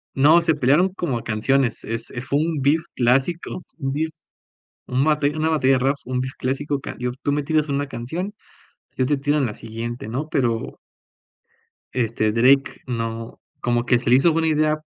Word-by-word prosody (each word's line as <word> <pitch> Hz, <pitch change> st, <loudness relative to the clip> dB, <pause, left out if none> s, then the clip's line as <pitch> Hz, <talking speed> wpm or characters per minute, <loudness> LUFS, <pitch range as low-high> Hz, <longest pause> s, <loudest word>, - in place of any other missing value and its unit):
No, 150 Hz, +5 st, +6 dB
se 165 Hz, -2 st, +2 dB
pelearon 145 Hz, +7 st, +3 dB
como 175 Hz, -9 st, -2 dB
a 115 Hz, -, -7 dB
canciones. 120 Hz, +2 st, +1 dB
Es 115 Hz, +1 st, -4 dB
es 120 Hz, +1 st, -6 dB
fue 140 Hz, -, +1 dB
un 160 Hz, -2 st, -1 dB
beef 145 Hz, +4 st, +3 dB
clásico, 135 Hz, +9 st, +1 dB
un 135 Hz, -4 st, -2 dB
beef, 160 Hz, +3 st, -1 dB, 0.8 s
un 130 Hz, +2 st, +1 dB
batalla 150 Hz, 0 st, +1 dB
una 155 Hz, +1 st, +1 dB
batalla 135 Hz, -4 st, +3 dB
de 130 Hz, -, +3 dB
rap, 135 Hz, +3 st, +2 dB
un 125 Hz, 0 st, -2 dB
beef 130 Hz, +1 st, -3 dB
clásico 140 Hz, +2 st, -2 dB
cayó, 125 Hz, -2 st, -4 dB
tú 145 Hz, -, +1 dB
me 145 Hz, 0 st, 0 dB
tiras 155 Hz, 0 st, +1 dB
una 140 Hz, +1 st, -1 dB
canción, 160 Hz, -, -5 dB, 0.6 s
yo 130 Hz, -, +1 dB
te 145 Hz, +2 st, +2 dB
tiro 145 Hz, +2 st, 0 dB
en 140 Hz, -, +2 dB
la 105 Hz, -, -5 dB
siguiente, 115 Hz, +1 st, -6 dB
¿no? 135 Hz, +7 st, -3 dB
Pero 120 Hz, -6 st, -1 dB, 1.2 s
este, 115 Hz, -3 st, 0 dB
Drake 130 Hz, +4 st, +3 dB
no 115 Hz, -1 st, -4 dB, 0.2 s
como 120 Hz, 0 st, 0 dB
que 125 Hz, 0 st, +4 dB
se 120 Hz, -, -2 dB
le 125 Hz, -, +7 dB
hizo 165 Hz, +5 st, +4 dB
buena 165 Hz, 0 st, +1 dB
idea 155 Hz, 0 st, +1 dB
135 Hz, 190 wpm, -22 LUFS, 120-155 Hz, 1.2 s, le